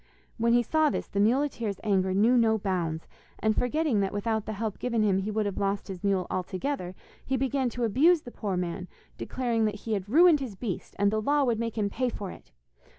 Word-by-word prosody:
When 235 +1 +3
he 240 0 +4
saw 310 +5 +2
this - - -3
the 200 - -3
muleteer's 230 -2 +1
anger 190 -3 +1
knew 215 +6 +4
no 225 -2 +4
bounds, 175 -6 -2 0.3
and 215 0 +1
forgetting 275 -2 +1
that 195 -1 0
without 220 +1 -2
the 220 - -3
help 215 0 -4
given 235 -3 0
him 195 -2 +2
he 195 +2 -3
would 215 0 0
have 200 -2 -3
lost 200 0 -1
his 185 -1 -7
mule 195 -2 +1
altogether, 185 +2 -3 0.3
he 265 - -1
began 265 0 0
to 245 +1 -4
abuse 300 - +4
the 245 - -9
poor 200 -6 -3
man, 180 +1 -3 0.3
declaring 235 -3 -1
that 210 -1 -1
he 225 - -1
had 200 -1 -3
ruined 325 +4 +6
his 250 -7 -5
beast, 195 -3 -5
and 200 0 +3
the 215 0 0
law 290 +5 +2
would 235 -4 +1
make 230 -1 -3
him 210 -2 +1
pay 255 +3 0
for 200 -5 -6
it. - - -14
220 Hz, 220 wpm, -28 LUFS, 195-245 Hz, 0.3 s, ruined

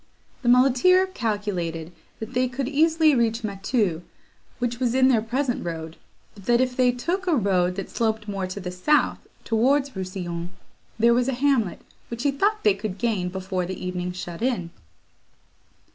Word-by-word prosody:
The 240 - +1
muleteer 265 +9 +5
calculated 205 - -3 0.3
that 225 +3 -7
they 255 0 +2
could 255 +1 -3
easily 315 +2 +3
reach 230 -2 +1
Mateau, 195 -3 -1 0.6
which 240 -1 -2
was 250 -1 0
in 260 0 +5
their 235 -4 +3
present 245 +3 -1
road; 165 -1 -5 0.4
but 200 -2 -15
that, 240 0 +3
if 255 -1 +1
they 250 -1 +4
took 350 +10 -3
a 340 - +3
road 185 -6 +1
that 195 - -4
sloped 220 -2 -1
more 195 -2 -3
to 185 +2 -6
the 180 -2 -5
south, 185 +12 +2 0.2
towards 270 +5 +2
Rousillon, 180 -2 -4 0.5
there 235 +1 +5
was 245 +1 +2
a 270 - 0
hamlet, 250 -7 +1 0.3
which 235 +1 -5
he 285 - +3
thought 410 +10 0
they 210 - +5
could 200 -1 -5
gain 205 -5 -1
before 185 -1 -3
the 185 - -5
evening 180 0 -3
shut 175 -1 -7
in. 230 -9 -1
230 Hz, 170 wpm, -24 LUFS, 185-260 Hz, 0.6 s, muleteer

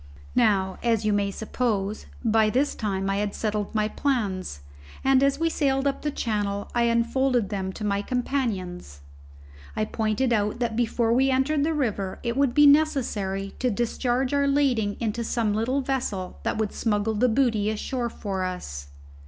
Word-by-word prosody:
Now, 190 -3 +2
as 225 -2 +1
you 210 - +2
may 200 -1 +1
suppose, 215 -1 -2 0.2
by 220 -1 +4
this 265 +6 +1
time 195 -3 -2
I 195 0 0
had 205 0 -2
settled 210 -1 -2
my 215 0 +2
plans; 205 - -2 0.4
and 270 0 +4
as 275 0 +3
we 330 - +2
sailed 275 -4 +1
up 275 -1 -1
channel, 205 -3 -2
I 240 -1 +2
unfolded 235 0 +1
them 190 -2 -3
to 215 - -7
my 200 -1 0
companions. 200 - -3 0.7
I 215 - 0
pointed 220 +3 0
out 210 0 0
that 235 -2 -1
before 230 0 +1
we 265 +2 +3
entered 275 +3 +2
the 320 +1 0
river 205 -9 -1
it 235 -1 -1
would 275 -2 +2
be 295 0 +7
necessary 235 -10 +2
to 250 - +1
discharge 245 +3 0
our 280 0 +2
lading 255 -8 +1
into 230 0 -2
some 225 -2 0
little 245 +6 0
vessel 245 -9 -3
that - - -2
would 215 -2 -1
smuggle 215 -1 0
the 245 +4 +2
booty 225 -4 +2
ashore 235 +3 -2
for 195 -4 -4
us. 70 - -5
225 Hz, 170 wpm, -25 LUFS, 205-260 Hz, 0.7 s, be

